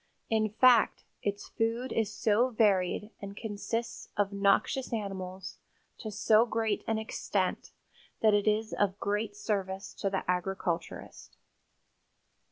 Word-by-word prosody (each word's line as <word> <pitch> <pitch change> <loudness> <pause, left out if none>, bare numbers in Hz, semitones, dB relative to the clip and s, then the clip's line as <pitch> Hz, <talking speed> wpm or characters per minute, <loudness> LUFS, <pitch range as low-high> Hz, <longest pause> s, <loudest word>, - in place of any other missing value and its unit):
In 215 -1 +2
fact, 235 +1 +4 0.2
its 205 0 -3
food 230 +3 -1
is 220 -2 0
so 220 +4 +2
varied 210 -2 +2
and 200 0 -7
consists 225 +2 -4
of 200 -1 +1
noxious 200 +6 +2
animals 190 -4 -5 0.4
to 220 - -5
so 215 +1 +4
great 225 -3 -1
an 225 - +1
extent 220 0 -2 0.5
that 215 -1 +5
it 205 0 +2
is 215 +1 +1
of 200 0 0
great 205 +1 -1
service 195 -2 -3
to 195 - -2
the 190 -1 -2
agriculturist. 180 -2 -3
205 Hz, 125 wpm, -30 LUFS, 195-225 Hz, 0.5 s, that